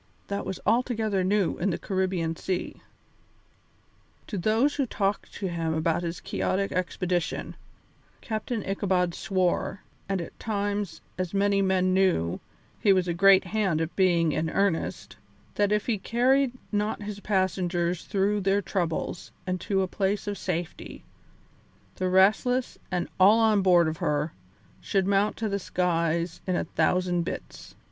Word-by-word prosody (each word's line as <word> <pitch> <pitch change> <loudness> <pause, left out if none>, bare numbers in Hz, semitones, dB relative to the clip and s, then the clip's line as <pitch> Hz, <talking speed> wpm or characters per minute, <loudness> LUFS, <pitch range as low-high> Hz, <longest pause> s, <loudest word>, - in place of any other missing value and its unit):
That 200 -1 -3
was 190 -2 -4
altogether 220 -4 +1
new 195 0 +1
in 195 - +1
the 170 - -1
Caribbean 185 -4 -1
Sea. 185 +2 -4 1.4
To 215 - -6
those 225 +10 +2
who 275 -3 -1
talked 200 -2 -1
to 195 - -3
him 165 -2 -2
about 165 +1 +1
his 170 -1 -4
quixotic 195 +1 -1
expedition, 180 -2 -2 0.6
Captain 220 -1 -3
Ichabod 185 -3 +1
swore 185 +1 -1 0.3
and 195 -1 0
at 170 - -8
times, 205 -2 -2 0.2
as 185 +1 -2
many 200 0 +3
men 185 -1 +2
knew, 185 - +2 0.4
he 200 - +4
was 185 -2 +3
a 170 - 0
great 195 +2 +6
hand 190 -4 0
at 165 +1 -3
being 170 -4 +3
in 155 +2 -1
earnest 160 - -1 0.4
that 205 0 +1
if 210 -1 +1
he 225 -5 0
carried 255 +5 +2 0.2
not 210 0 -1
his 205 -1 -6
passengers 180 -3 0
through 205 0 +1
their 195 +1 +2
troubles 175 -2 -2
and 185 -1 -2
to 195 -2 +1
a - - -1
place 195 +2 -1
of 205 0 -2
safety, 175 -3 -5 0.9
the 185 0 0
Restless, 215 +7 +3
and 180 -2 -1
all 200 +4 +7
on 220 -3 +4
board 175 -3 +5
of 155 0 -2
her, 150 +1 -1 0.5
should 195 -2 0
mount 200 +1 +2
to 225 - -1
the 200 -1 -1
skies 170 -2 -1
in 185 - +1
a - - 0
thousand 175 +2 +1
bits. 165 - -7
190 Hz, 150 wpm, -27 LUFS, 175-205 Hz, 1.4 s, all